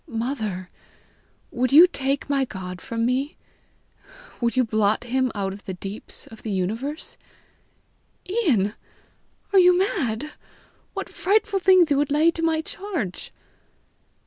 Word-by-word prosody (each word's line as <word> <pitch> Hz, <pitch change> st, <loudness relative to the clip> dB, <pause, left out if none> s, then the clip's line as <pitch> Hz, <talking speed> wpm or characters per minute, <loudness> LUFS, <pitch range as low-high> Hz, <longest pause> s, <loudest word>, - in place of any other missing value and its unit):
"Mother, 225 Hz, -6 st, -3 dB, 0.8 s
would 250 Hz, 0 st, 0 dB
you 315 Hz, +5 st, +10 dB
take 275 Hz, -5 st, -2 dB
my 280 Hz, -1 st, +1 dB
God 185 Hz, -6 st, -7 dB
from 230 Hz, 0 st, -2 dB
me? 260 Hz, +4 st, -1 dB, 1.0 s
Would 235 Hz, 0 st, 0 dB
you 255 Hz, -, +5 dB
blot 215 Hz, -2 st, +1 dB
him 255 Hz, +1 st, 0 dB
out 195 Hz, -1 st, -2 dB
of 200 Hz, -, -12 dB
the 190 Hz, -, -5 dB
deeps 195 Hz, +3 st, -8 dB
of 225 Hz, -, -13 dB
the 220 Hz, -, -5 dB
universe?" 220 Hz, -, -3 dB, 1.1 s
"Ian! 290 Hz, -, +1 dB, 0.8 s
are 390 Hz, -, +7 dB
you 360 Hz, -1 st, +6 dB
mad? 300 Hz, -, -1 dB, 0.6 s
What -, -, -4 dB
frightful 405 Hz, +1 st, +1 dB
things 370 Hz, -4 st, +5 dB
you 285 Hz, -, +4 dB
would 290 Hz, 0 st, +1 dB
lay 305 Hz, +4 st, +4 dB
to 335 Hz, -, -5 dB
my 325 Hz, -1 st, +1 dB
charge!" 330 Hz, -, -5 dB
260 Hz, 135 wpm, -24 LUFS, 215-325 Hz, 1.1 s, you